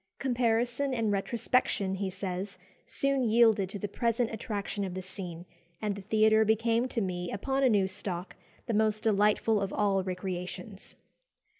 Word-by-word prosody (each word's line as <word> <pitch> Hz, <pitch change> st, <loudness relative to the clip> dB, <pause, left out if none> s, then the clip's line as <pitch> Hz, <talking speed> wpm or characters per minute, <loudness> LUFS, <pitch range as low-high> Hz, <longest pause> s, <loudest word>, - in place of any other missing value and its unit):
"Comparison 245 Hz, +1 st, 0 dB
and 225 Hz, -3 st, 0 dB
retrospection," 205 Hz, -1 st, 0 dB
he 190 Hz, 0 st, -2 dB
says, 185 Hz, +1 st, -5 dB, 0.3 s
"soon 275 Hz, -1 st, +1 dB
yielded 220 Hz, -4 st, +4 dB
to 205 Hz, -, -5 dB
the 205 Hz, -, -3 dB
present 230 Hz, +2 st, 0 dB
attraction 210 Hz, -3 st, -3 dB
of 185 Hz, -2 st, -4 dB
the 185 Hz, -, -3 dB
scene, 180 Hz, -2 st, -8 dB, 0.3 s
and 210 Hz, -1 st, -1 dB
the 200 Hz, -, -7 dB
theatre 220 Hz, +2 st, +4 dB
became 225 Hz, +3 st, +2 dB
to 240 Hz, -2 st, -2 dB
me, 180 Hz, -2 st, -3 dB
upon 270 Hz, +7 st, -1 dB
a 265 Hz, -, +5 dB
new 205 Hz, -4 st, +3 dB
stock, 190 Hz, -1 st, -5 dB, 0.3 s
the 235 Hz, -, -2 dB
most 215 Hz, 0 st, +1 dB
delightful 210 Hz, 0 st, +3 dB
of 195 Hz, -1 st, -2 dB
all 200 Hz, -2 st, +2 dB
recreations." 185 Hz, +1 st, -6 dB
210 Hz, 155 wpm, -30 LUFS, 190-230 Hz, 0.3 s, a